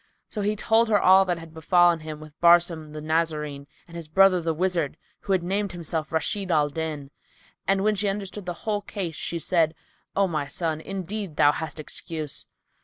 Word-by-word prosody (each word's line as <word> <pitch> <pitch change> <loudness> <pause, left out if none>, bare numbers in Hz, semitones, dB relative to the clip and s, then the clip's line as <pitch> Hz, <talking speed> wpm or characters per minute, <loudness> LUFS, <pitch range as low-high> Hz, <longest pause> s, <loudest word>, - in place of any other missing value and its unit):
So 210 - -4
he 210 +1 0
told 225 +2 +3
her 210 -2 +4
all 190 +1 +6
that 175 -2 0
had 165 -1 -11
befallen 175 +1 +4
him 155 -1 -7
with 155 -1 -12
Barsum 170 -2 +4
the 155 0 -7
Nazarene 155 -3 -1 0.2
and 170 - -13
his 165 -2 -6
brother 190 +2 +5
the 165 0 0
wizard 170 -3 -1 0.2
who - - -5
had 185 -2 +2
named 195 +2 -1
himself 160 -2 -3
Rashid 185 +4 -1
al 150 -3 +3
Din 150 -2 -4 0.6
and, 195 +1 +2
when 215 +1 +3
she 205 0 0
understood 195 -1 -5
the 175 - -1
whole 210 -2 0
case, 195 -5 -5
she 170 - -3
said, 165 -1 +1 0.4
"O 195 0 +3
my 155 -5 -2
son, 160 -1 -2
indeed 195 -1 -5
thou 145 0 +5
hast 155 0 -5
excuse." 155 -1 -5
170 Hz, 190 wpm, -25 LUFS, 155-195 Hz, 0.6 s, all